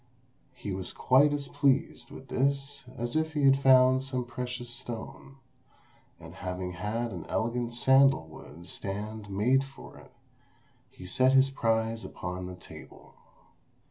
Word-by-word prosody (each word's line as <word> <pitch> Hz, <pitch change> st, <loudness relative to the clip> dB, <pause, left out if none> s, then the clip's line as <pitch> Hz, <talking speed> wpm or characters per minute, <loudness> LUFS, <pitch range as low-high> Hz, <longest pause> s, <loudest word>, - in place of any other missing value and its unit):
He 115 Hz, -5 st, -6 dB
was 95 Hz, -1 st, -5 dB
quite 140 Hz, +3 st, +4 dB
as 145 Hz, -1 st, -2 dB
pleased 140 Hz, -2 st, 0 dB
with 130 Hz, -, -12 dB
this 140 Hz, +1 st, -1 dB
as 120 Hz, +3 st, -4 dB
if 160 Hz, 0 st, 0 dB
he 150 Hz, -1 st, -1 dB
had 135 Hz, 0 st, +5 dB
found 130 Hz, -1 st, +6 dB
some 130 Hz, -2 st, -3 dB
precious 125 Hz, 0 st, -5 dB
stone; 120 Hz, +3 st, -6 dB, 0.8 s
and -, -, -11 dB
having 90 Hz, 0 st, -5 dB
had 110 Hz, +6 st, -3 dB
an 90 Hz, -5 st, -6 dB
elegant 120 Hz, +1 st, -1 dB
sandal 135 Hz, -3 st, +4 dB
wood 80 Hz, +2 st, -13 dB
stand 105 Hz, +3 st, -6 dB
made 120 Hz, +8 st, +2 dB
for 135 Hz, 0 st, -13 dB
it, -, -, -17 dB, 0.8 s
he 90 Hz, -, -13 dB
set 130 Hz, +7 st, +3 dB
his 135 Hz, 0 st, +5 dB
prize 115 Hz, -3 st, 0 dB
upon 90 Hz, +1 st, -6 dB
the 90 Hz, -, -7 dB
table. 90 Hz, -, -13 dB
120 Hz, 140 wpm, -29 LUFS, 105-135 Hz, 0.8 s, found